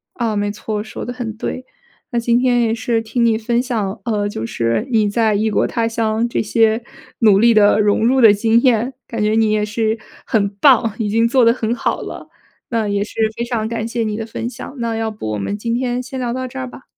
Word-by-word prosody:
啊， 230 -3 -1
没 205 0 -1
错， 210 0 -4
说 220 - -7
得 245 - -4
很 230 -3 -5
对。 255 +2 -4 0.5
那 240 - 0
今 235 0 +2
天 245 -1 +2
也 225 -1 +1
是 230 0 -1
听 225 +2 0
你 225 -1 +3
分 235 +2 0
享， 220 -6 -3
呃， 210 -3 0
就 115 - -4
是 115 0 -1
你 215 -3 +3
在 220 0 +2
异 215 +2 +1
国 - - +1
他 230 -1 -1
乡 225 0 0
这 - - 0
些 220 +1 +2 0.4
努 210 -4 +5
力 235 +2 +5
的 210 -1 +5
融 210 +1 +2
入 260 +1 +3
的 225 - +8
经 225 +3 +2
验， 245 0 +2
感 230 -2 -4
觉 210 - +2
你 220 0 +3
也 210 -1 +1
是 220 +1 -1 0.3
很 205 -3 +1
棒， 230 -5 +5
已 210 -2 -1
经 230 +2 +2
做 250 +1 +3
得 230 - +6
很 235 -1 -2
好 240 - -2
了。 - - -8 0.4
那 225 -3 0
也 200 0 0
是 210 - -10 0.2
非 235 - -3
常 235 -2 -2
感 230 0 -3
谢 230 0 -2
你 215 -1 -2
的 220 +1 -4
分 230 +1 -5
享， 265 - -9
那 230 -1 -2
要 225 0 -1
不 210 - -5
我 105 - -2
们 100 - -3
今 230 +2 -3
天 245 0 -1
先 260 +1 -6
聊 245 -2 -2
到 255 0 -3
这 265 +1 -8
儿 255 - -4
吧。 260 - -13
225 Hz, 260 characters per minute, -18 LUFS, 215-235 Hz, 0.5 s, 的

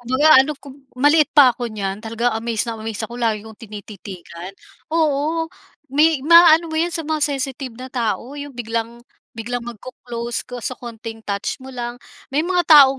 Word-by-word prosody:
kumbaga 260 +6 +2
ano 285 +3 +1
'ko 280 -1 -12 0.2
maliit 295 +3 +4
pa 265 -4 +8
ako 240 0 -4
niyan. 200 -2 -4
Talaga 230 +2 -1
amaze 225 0 -1
na 225 -1 -5
amaze 220 0 -4
ako, 240 +2 -8
lagi 220 -3 0
kong 220 -1 -12
tinititigan. 195 -4 -9 0.4
Oo, 320 +1 +1 0.5
may 300 -1 +3
maaano 335 0 +7
mo - - -2
'yan 345 +1 +1
sa 325 - -3
mga 310 0 -1
sensitive 270 -3 -2
na 255 +1 -8
tao, 240 +1 -2
'yong 285 -3 -8
biglang 230 0 -4 0.3
biglang 240 +2 -3
mag-co-close 240 0 -6
ko 250 - -6
sa 255 - -2
konting 225 -2 -9
touch 200 +5 -3
mo 265 - -9
lang. 240 -2 -5 0.4
May 300 - +3
mga 355 -1 +1
taong 275 -4 +8
245 Hz, 175 wpm, -20 LUFS, 225-290 Hz, 0.5 s, pa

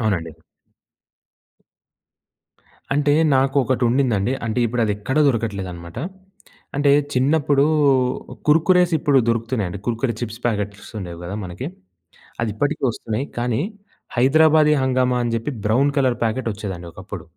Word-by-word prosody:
అవునండి. 85 -8 -1 2.6
అంటే 145 +1 +2 0.2
నాకు 135 +1 +2
ఒకటుండిందండి. 125 -2 +1
అంటే 110 +2 -1
ఇప్పుడు 120 +1 -1
అది 105 - +1
ఎక్కడ 130 +7 -4
దొరకట్లేదనమాట. 95 -7 -3 0.8
అంటే 145 0 +3 0.2
చిన్నప్పుడు 140 +1 +3 0.8
కుర్కురేస్ 175 +3 +4
ఇప్పుడు 140 -2 +3
దొరుకుతున్నాయండి. 115 -5 -1
కుర్కురే 120 +1 -1
చిప్స్ 115 -1 -5
ప్యాకెట్స్ 105 -2 -3
ఉండేవి 85 -2 -7
గదా! 95 +4 -5
మనకి. 95 - -6 0.7
అది 115 - 0
ఇప్పటికి 145 +5 -1
వస్తున్నాయి. 115 +2 -3
కానీ 120 +2 0 0.6
హైదరాబాదీ 150 +4 +5
హంగామా 125 -1 +1
అని 115 -1 -1
చెప్పి 115 +6 -4
బ్రౌన్ 130 +7 +3
కలర్ 130 -3 +2
ప్యాకెట్ 115 +1 -1
వచ్చేదండి 95 -5 -6
ఒకప్పుడు. 95 -2 -8
120 Hz, 115 wpm, -21 LUFS, 105-135 Hz, 2.6 s, హైదరాబాదీ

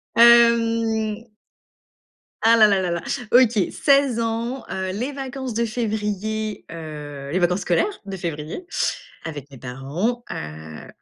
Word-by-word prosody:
hem. 230 -2 +4 1.2
Ah 230 +1 +6
là 215 - +8
là 200 -2 +2
là 180 -2 -1
là, 170 0 -2 0.3
OK, 245 -2 +6 0.2
16 275 -4 +3
ans, 230 +3 -2
heu, 190 0 -3
les 240 +9 -3
vacances 265 -2 -5
de 235 +1 +1
février, 215 -1 -3
heu, 150 -4 -7
les 180 - +1
vacances 180 +2 +2
scolaires 285 - 0
de 195 -1 -5
février 165 - -5 0.6
avec 145 -3 -7
mes 135 - -11
parents, 140 - -3
heu, 80 0 -7
215 Hz, 130 wpm, -22 LUFS, 165-235 Hz, 1.2 s, là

